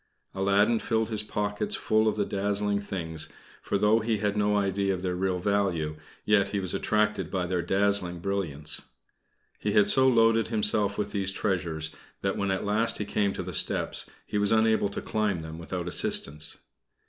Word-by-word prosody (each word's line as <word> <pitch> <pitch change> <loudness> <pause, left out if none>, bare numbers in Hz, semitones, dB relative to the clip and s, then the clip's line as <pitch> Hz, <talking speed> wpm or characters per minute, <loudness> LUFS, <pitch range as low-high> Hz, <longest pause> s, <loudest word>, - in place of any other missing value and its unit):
Aladdin 100 +4 +2
filled 110 0 -1
his 110 -1 -1
pockets 105 0 -2
full 110 0 +1
of 110 - +1
the 105 -1 0
dazzling 100 +1 0
things, 80 -6 -4 0.3
for 100 - -1
though 105 +3 +4
he 110 0 0
had 105 0 -1
no 105 0 +2
idea 100 -1 +1
of 90 - -8
their 90 -1 -1
real 95 0 0
value, 90 -5 0 0.3
yet 105 -2 +3
he 100 - -1
was 95 -2 -3
attracted 105 +2 0
by 90 -2 -1
their 90 0 -1
dazzling 95 0 +1
brilliance. 85 -5 -2 0.8
He 105 - -1
had 105 - +5
so 130 0 +5
loaded 115 -2 +4
himself 105 -2 +1
with 105 -1 -2
these 100 -2 -1
treasures 85 -6 -2 0.3
that 95 0 0
when 100 -1 -1
at 95 +1 -1
last 110 +3 +1
he 105 - -3
came 100 0 0
to - - -4
the 90 0 -6
steps - - +2 0.2
he 105 - -2
was 105 0 +2
unable 110 -2 +3
to - - -5
climb 105 -6 -1
them 80 +1 -8
without 85 +1 -5
assistance. 75 -3 -1
100 Hz, 185 wpm, -27 LUFS, 90-105 Hz, 0.8 s, had